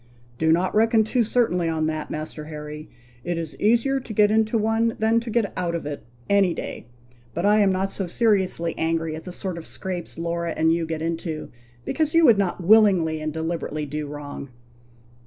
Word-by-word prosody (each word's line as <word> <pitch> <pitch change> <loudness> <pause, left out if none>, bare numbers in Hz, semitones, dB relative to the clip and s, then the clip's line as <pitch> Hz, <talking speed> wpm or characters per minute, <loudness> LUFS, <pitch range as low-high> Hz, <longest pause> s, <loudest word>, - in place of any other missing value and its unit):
"Do 160 0 +3
not 175 +3 +2
reckon 225 +1 +4
too 240 +3 +1
certainly 210 -7 +1
on 160 -1 0
that, 155 -1 -3
Master 155 0 -5
Harry; 150 0 -8 0.3
it 175 -1 -2
is 165 -2 -5
easier 235 +6 +3
to 240 -4 -8
get 210 0 +4
into 220 +1 +2
one 225 +1 +1
than 220 +1 +3
to 230 0 -7
get 225 -3 0
out 175 -2 -1
of 170 - -4
it, 145 -1 -5 0.2
any 200 -3 +3
day; - - -6 0.5
but 170 - -1
I 210 +1 +5
am 200 -2 +4
not 190 +1 -1
so 195 - -3
seriously 190 -5 +1
angry 165 -1 0
at 160 - -9
the 180 - -6
sort 180 -1 -4
of 160 - -10
scrapes 180 -4 -6
Laura 170 0 -2
and 160 +1 +3
you 165 -1 -1
get 160 -1 -3
into, 165 -1 -4 0.3
because 315 0 0
you 330 -1 +6
would 220 -6 +6
not 185 -2 -1
willingly 185 -6 +4
and 155 0 -2
deliberately 160 -1 -3
do 150 +1 -4
wrong. 145 -1 -7
175 Hz, 195 wpm, -24 LUFS, 160-215 Hz, 0.5 s, you